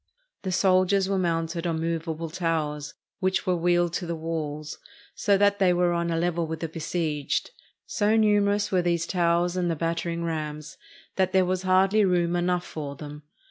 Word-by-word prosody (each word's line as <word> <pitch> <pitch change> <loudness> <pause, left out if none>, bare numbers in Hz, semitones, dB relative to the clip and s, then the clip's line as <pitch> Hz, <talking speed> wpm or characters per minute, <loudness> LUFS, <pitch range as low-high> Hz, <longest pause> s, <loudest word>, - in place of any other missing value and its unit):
The 190 - -3
soldiers 185 +1 +3
were 195 -1 0
mounted 165 -1 -1
on 165 -1 -1
movable 165 0 -3
towers, 155 -4 -2 0.2
which 190 0 0
were 185 -2 +2
wheeled 175 0 +1
to 175 -1 -3
the 170 - -2
walls, 155 -2 -4 0.3
so 200 -2 +2
that 200 0 +3
they 185 -2 +4
were 175 0 +2
on 170 0 -1
a 165 - 0
level 170 -1 0
with 160 0 -5
the 165 - -1
besieged. 160 - -2 0.3
So 210 0 +1
numerous 205 -1 +2
were 185 -2 +3
these 170 -1 0
towers 175 0 +1
and 180 -1 0
the 165 - 0
battering 165 +1 -2
rams, 155 -2 -4 0.4
that 190 -1 +1
there 190 -1 +4
was 185 0 -1
hardly 190 +3 +3
room 175 -2 +2
enough 175 0 0
for 145 -3 -6
them. 150 +1 -9
175 Hz, 180 wpm, -26 LUFS, 165-185 Hz, 0.4 s, they